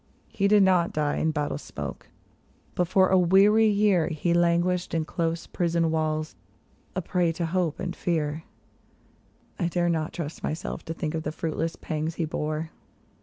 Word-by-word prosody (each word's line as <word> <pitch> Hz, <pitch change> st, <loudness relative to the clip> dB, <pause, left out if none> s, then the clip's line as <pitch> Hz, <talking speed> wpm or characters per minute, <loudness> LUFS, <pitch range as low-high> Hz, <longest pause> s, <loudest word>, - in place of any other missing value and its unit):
He 200 Hz, -, +1 dB
did 205 Hz, 0 st, +6 dB
not 180 Hz, -3 st, +3 dB
die 150 Hz, -1 st, 0 dB
in 160 Hz, -, +1 dB
battle 150 Hz, -2 st, -2 dB
smoke, -, -, -7 dB, 0.7 s
but 180 Hz, -, 0 dB
for 185 Hz, +1 st, +4 dB
a 190 Hz, -, +5 dB
weary 200 Hz, +5 st, +5 dB
year 200 Hz, -6 st, +3 dB
He 170 Hz, +1 st, 0 dB
languished 175 Hz, +1 st, +1 dB
in 160 Hz, -1 st, 0 dB
close 165 Hz, 0 st, -2 dB
prison 170 Hz, -2 st, 0 dB
walls, 155 Hz, -1 st, -1 dB, 0.6 s
a 185 Hz, -, -2 dB
prey 175 Hz, -1 st, +1 dB
to 170 Hz, +1 st, -2 dB
hope 170 Hz, -2 st, -1 dB
and 175 Hz, 0 st, -4 dB
fear; 160 Hz, -2 st, -1 dB, 1.2 s
I 175 Hz, -, +1 dB
dare 175 Hz, 0 st, 0 dB
not 160 Hz, -2 st, -1 dB
trust 160 Hz, -2 st, -6 dB
myself 155 Hz, -, -4 dB
to 165 Hz, -, -5 dB
think 155 Hz, -1 st, -3 dB
of 160 Hz, -, -2 dB
the 155 Hz, -, -3 dB
fruitless 165 Hz, +1 st, -3 dB
pangs 155 Hz, +1 st, -3 dB
he 165 Hz, -, -1 dB
bore. 155 Hz, +1 st, -3 dB
170 Hz, 170 wpm, -26 LUFS, 155-180 Hz, 1.2 s, did